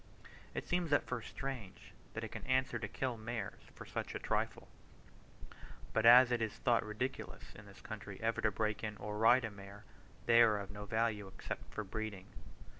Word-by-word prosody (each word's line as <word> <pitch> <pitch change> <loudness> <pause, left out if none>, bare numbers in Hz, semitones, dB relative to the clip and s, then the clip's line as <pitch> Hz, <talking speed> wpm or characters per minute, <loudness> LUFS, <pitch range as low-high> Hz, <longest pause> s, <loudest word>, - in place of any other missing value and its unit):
It - - -3
seems 175 -3 0
at - - +4
first 125 -3 -4
strange 110 -8 -6 0.2
that 110 - -3
it 110 - -4
can - - -6
answer 130 0 +2
to - - -3
kill 130 -3 -2
mares 110 -2 -5
for - - -9
such - - -4
a - - -2
trifle; - - -1 1.3
but 110 +1 +4
as 125 +1 +9
it 120 -1 +1
is 110 -2 -1
thought 120 -2 +2
ridiculous 110 +5 -4
in 105 0 -12
this 100 - -14
country 105 -3 -7
ever 115 0 0
to - - +3
break 105 +1 -1
in 105 -1 -3
or 105 +1 -5
ride 120 +3 +6
a 110 - -4
mare, 100 +1 -11 0.4
they 120 0 +7
are 110 -3 +6
of 100 -1 -6
no 105 0 -7
value 110 -1 0
except 95 - -7
for 110 - -3
breeding. 105 -1 -5
110 Hz, 190 wpm, -36 LUFS, 105-120 Hz, 1.3 s, as